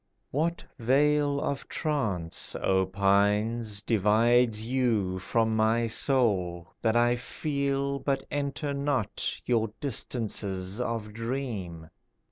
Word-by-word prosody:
What 165 +5 -1
veil 145 +3 +3
of 140 -1 -3
trance, 105 - -1
O 95 -1 +1
pines, 100 +3 +1
Divides 110 +2 +3
you 115 -7 0
from 110 +3 +1
my 110 +2 +2
soul, 100 -8 +1
That 110 0 +1
I 120 +1 +4
feel 140 +1 -2
but 135 -1 -1
enter 145 0 -2
not 140 -5 -1
Your 115 -3 +1
distances 105 -6 -2
of 115 -3 -3
dream? 110 -9 -4
115 Hz, 100 wpm, -28 LUFS, 100-135 Hz, -, I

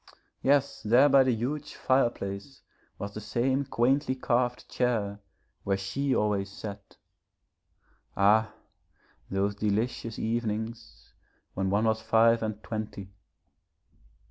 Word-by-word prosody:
Yes, 140 0 +2
there 120 +6 +5
by 135 0 +7
the 130 - +2
huge 140 +6 -4
fireplace 120 -2 -1 0.3
was 100 0 -6
the 105 - -6
same 125 +6 0
quaintly 130 +2 +1
carved 125 -1 0
chair 110 -5 -1 0.4
where 95 -1 0
she 130 +9 -1
always 100 -2 0
sat. 100 0 -9 1.2
Ah, 110 +2 +4 0.8
those 100 +1 0
delicious 110 +2 -2
evenings 110 0 -4 0.4
when 95 0 -1
one 105 +3 +2
was 110 0 +1
five 115 +1 +4
and 110 -1 -4
twenty. 105 -3 -5
110 Hz, 110 wpm, -28 LUFS, 100-125 Hz, 1.2 s, by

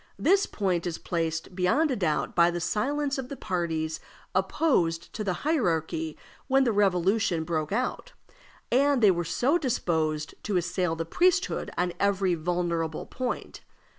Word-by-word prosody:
This 390 +3 +3
point 185 -4 -1
is 170 - -3
placed 165 0 -3
beyond 230 - +2
a - - +1
doubt 155 - -1
by 170 0 +5
the 175 0 -2
silence 275 - -1
of 255 -1 -5
the 280 - -5
parties 160 -4 -2 0.3
opposed 185 - +1
to 215 - -3
the 190 -3 0
hierarchy 160 - 0 0.3
when 270 0 +4
the 240 - +2
Revolution 195 -2 +2
broke 155 -2 -2
out, 255 - -2 0.6
and 275 0 +3
they 205 - +8
were 175 -1 -1
so 270 - +1
disposed 160 - -1
to 205 -3 -1
assail 180 -1 0
the 165 0 -3
priesthood 365 - +1
on 180 0 0
every 195 -2 +2
vulnerable 170 -1 -1
point. 250 -1 -4
180 Hz, 150 wpm, -27 LUFS, 165-250 Hz, 0.6 s, they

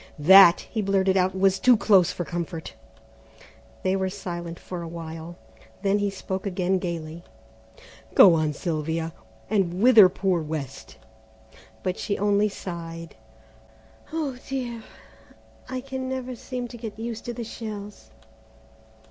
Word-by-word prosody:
"That," 175 +3 +8
he 220 - -4
blurted 195 -1 +2
out, 185 0 +1
"was 190 0 +3
too 250 +1 +5
near 195 -4 +7
for 175 - -4
comfort." 170 -1 -5 1.1
They 185 +1 +1
were 190 -1 -1
silent 175 -3 -6
for 180 -2 -7
a 170 - -6
while, 165 0 -8 0.5
then 200 +1 +2
he 205 0 0
spoke 190 0 -5
again 185 0 0
gaily: 170 -2 -5 0.9
"Go 185 - +9
on, 155 -2 +1
Sylvia, 160 0 -3 0.3
and 190 -4 0
wither 225 -7 +8
poor 185 -2 0
West;" 150 -4 -6 0.9
but 185 -1 -2
she 205 - -2
only 205 +1 +2
sighed, 165 -4 -7 1.0
"Oh, 300 -5 -3
dear, 245 -4 -4 0.9
I 255 0 -3
can 265 0 -5
never 260 -1 -4
seem 250 0 -5
to 240 - -9
get 220 -3 -7
used 230 0 -6
to 240 - -4
the 235 - -4
shells." 210 -2 -8
190 Hz, 135 wpm, -25 LUFS, 170-215 Hz, 1.1 s, Go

